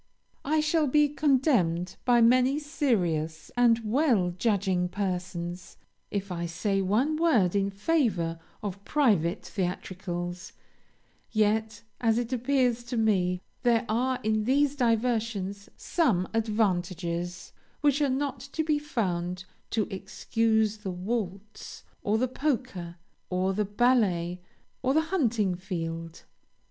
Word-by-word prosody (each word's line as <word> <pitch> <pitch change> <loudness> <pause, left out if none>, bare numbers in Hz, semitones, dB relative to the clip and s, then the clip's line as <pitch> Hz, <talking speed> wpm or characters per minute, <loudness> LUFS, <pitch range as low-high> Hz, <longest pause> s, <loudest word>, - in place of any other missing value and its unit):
I 305 +2 +2
shall 305 0 +2
be 295 +2 +4
condemned 245 - +2
by 240 -1 +5
many 255 +4 +4
serious 180 - -1
and 240 -2 +4
well 225 - +2
judging 190 -3 +1
persons, 180 -2 -4 0.3
if 200 -1 -3
I 170 -1 -3
say 195 +3 -1
one 240 +11 +1
word 235 - +3
in 200 0 +2
favor 200 - 0 0.2
of 200 -1 -5
private 205 - +1
theatricals; 180 -2 -4 0.8
yet, 215 0 0 0.2
as 225 -2 +2
it 240 +1 -2
appears 250 -1 +1
to 240 0 -3
me, 185 -5 +2 0.2
there 240 -1 +3
are 250 +4 +1
in 215 0 +1
these 280 +3 +2
diversions 225 -5 0
some 220 - +1
advantages 180 -5 -1 0.3
which 290 -1 +3
are 285 - +3
not 270 0 -1
to 280 +5 -3
be 305 -1 +1
found 180 -10 -2 0.2
to 220 -3 0
excuse 220 +2 0
the 210 -2 -6
waltz, 195 +2 -5 0.2
or 210 +2 +1
the 255 +3 +1
polka, 250 - -2 0.4
or 185 +1 0
the 210 +2 0
ballet, 200 -6 +1 0.4
or 265 +2 +1
the 315 - +5
hunting 225 - +2
field. 165 -3 -5
215 Hz, 120 wpm, -28 LUFS, 180-255 Hz, 0.8 s, by